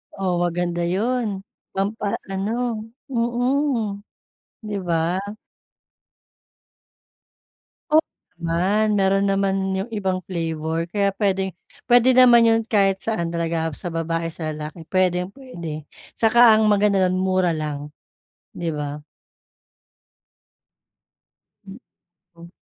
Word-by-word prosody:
Oh, 190 -2 -1
maganda 175 0 -1
'yon, 230 +7 0 0.5
pampa-ano 210 +3 -2 0.3
mm. 240 -2 0 0.7
'Di 205 -1 -3
ba? 165 +1 +1 2.7
O - - +4 0.4
naman. 190 +6 +1
Mayro'n 195 +1 +2
naman 195 0 +1 0.2
'yong 195 +5 -3
ibang 190 -3 -1
flavor 165 -2 -2
kaya 200 0 +2
puwedeng 190 -2 0 0.3
puwede 245 +1 +6
naman 245 -2 +7
'yon 225 0 +4
kahit 195 -3 +2
saan 170 -7 -2
talaga, 165 -1 -1
sa 175 - -6
babae, 165 0 -2
sa 160 -1 -4
lalaki, 155 +2 -7
puwedeng 180 0 +1
puwede. 170 - -8 0.3
Saka 235 +1 +6
ang 215 0 +3
maganda 205 -1 +3
do'n 180 - -1
mura 185 -2 +1
lang, 150 -1 -4 0.7
'di 170 - -3
ba? 145 0 -5 2.6
Hmm, 195 0 -10 0.6
o 170 0 -12
190 Hz, 100 wpm, -22 LUFS, 170-215 Hz, 2.7 s, naman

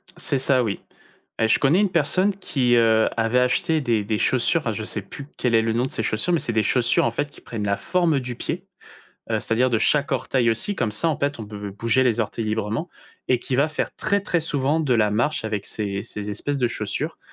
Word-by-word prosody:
C'est 140 - -1
ça, 130 -1 +3
oui. 105 -4 -2 0.6
Beh, 110 - +2
je 110 - +3
connais 150 +6 +3
une 205 -3 +1
personne 180 +6 +2
qui, 130 -10 +1
heu, 110 -1 +4
avait 115 +2 +2
acheté 155 +6 +1
des 115 -5 0
des 105 +1 -1
chaussures 130 +6 +2
enfin, 115 - -2
je 110 0 -4
sais 105 0 -3
plus 135 +8 -10
quel 125 -2 0
est 115 - +5
le 110 0 0
nom 120 +2 +1
de 130 - -6
ses - - -2
chaussures, 110 +12 0
mais 170 - +3
c'est 115 - -1
des 110 -1 +2
chaussures, 120 +2 +2
en 115 - +1
fait, 145 +5 -2
qui - - -16
prennent 110 -3 -5
la 100 0 0
forme 170 - +1
du 125 -2 -5
pied, - - -4 0.7
heu, - - +1
c'est-à-dire 125 +3 +1
de 115 - +2
chaque 145 +6 +2
orteil 120 -3 +1
aussi, 115 - 0
comme 110 - 0
ça, 165 +10 +1
en 155 - -1
fait. 145 -1 -1
On 110 - -6
peut 105 -1 -7
bouger 115 +5 +1
les 120 -2 +2
orteils 110 +1 -3
librement, 110 +8 -2 0.4
et 125 - +3
qui 125 - -3
va 140 +4 +3
faire 155 - -3
très 200 0 +1
très 180 -3 0
souvent 150 0 0
de 140 -5 +1
la 105 -2 +3
marche 120 +6 0
avec 105 -2 -3
ces 100 -2 -3
ces 105 0 -5
espèces 140 +8 -3
de 125 -2 +1
chaussures. 115 +9 -4
120 Hz, 240 wpm, -23 LUFS, 110-145 Hz, 0.7 s, est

